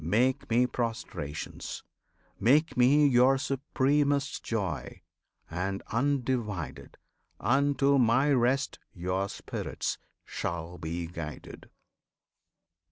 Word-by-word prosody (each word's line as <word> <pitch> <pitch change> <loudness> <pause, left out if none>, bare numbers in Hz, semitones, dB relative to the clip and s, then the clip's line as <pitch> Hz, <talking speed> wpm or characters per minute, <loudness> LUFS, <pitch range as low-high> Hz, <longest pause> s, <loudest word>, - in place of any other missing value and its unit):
Make 120 +10 +1
Me 120 +2 +4
prostrations! 115 - -4 0.6
Make 150 +7 +3
Me 140 +4 +5
your 130 0 +5
supremest 140 +1 0
joy! 95 -10 -3 0.4
and, 95 +3 -3
undivided, 115 - -1 0.4
Unto 140 +1 +3
My 130 +4 +4
rest 130 +2 +1 0.2
your 95 +2 -1
spirits - - -4 0.3
shall 85 +1 -4
be 85 +2 -3
guided. 85 -3 -8
120 Hz, 85 wpm, -29 LUFS, 90-135 Hz, 0.6 s, Me